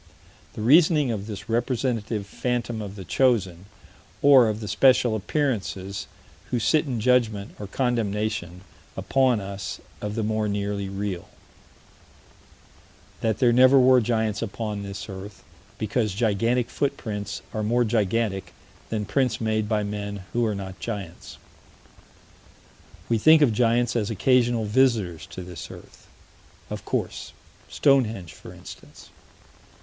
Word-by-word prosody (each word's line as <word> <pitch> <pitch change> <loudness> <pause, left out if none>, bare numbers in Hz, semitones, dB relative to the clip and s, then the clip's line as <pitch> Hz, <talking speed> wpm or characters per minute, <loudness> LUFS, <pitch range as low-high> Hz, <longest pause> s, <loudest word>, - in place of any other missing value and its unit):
The 105 - -5
reasoning 150 +1 +5
of 105 -2 -4
this 105 -2 -7
representative 115 -3 -1
phantom 120 +1 -3
of 100 -1 -7
the 95 -3 -8
chosen, 95 -4 +1 0.6
or 135 -5 +7
of 105 0 -3
the 105 - -6
spectral 120 +2 +4
appearances 105 -5 -2 0.4
who 125 - 0
sit 145 +8 +2
in 125 -4 -2
judgment, 110 -4 +1
or 105 - -6
condemnation, 105 -6 -2 0.4
upon 130 -4 +2
us 100 -1 -6 0.2
of 105 0 -4
the 115 - -1
more 110 0 0
nearly 100 -1 -2
real: 100 -3 -4 1.9
That 110 -2 0
there 120 -3 +4
never 130 +2 +7
were 130 0 +6
giants 110 -2 0
upon 105 -2 -4
this 100 -1 -7
earth, 95 0 -9 0.3
because 110 -1 -1
gigantic 115 +2 +1
footprints 105 -7 -3
are 110 - -2
more 120 +3 +2
gigantic 110 -2 -1 0.4
than 105 -2 -2
prints 125 +1 0
made 110 -1 -1
by 105 -2 +1
men 100 -1 -5
who 120 - +1
are 105 - -1
not 95 -1 -7
giants. 100 -7 -7 1.7
We 115 -1 +1
think 155 +5 +6
of 120 -6 +3
giants 120 +1 +2
as 105 -3 0
occasional 120 +1 +2
visitors 105 -7 +1
to 95 - -8
this 90 -3 -8
earth. - - -14 0.6
Of - - -6
course - - -3 0.4
Stonehenge, 115 - +1
for - - -12
instance. - - -13
110 Hz, 130 wpm, -25 LUFS, 100-120 Hz, 1.9 s, or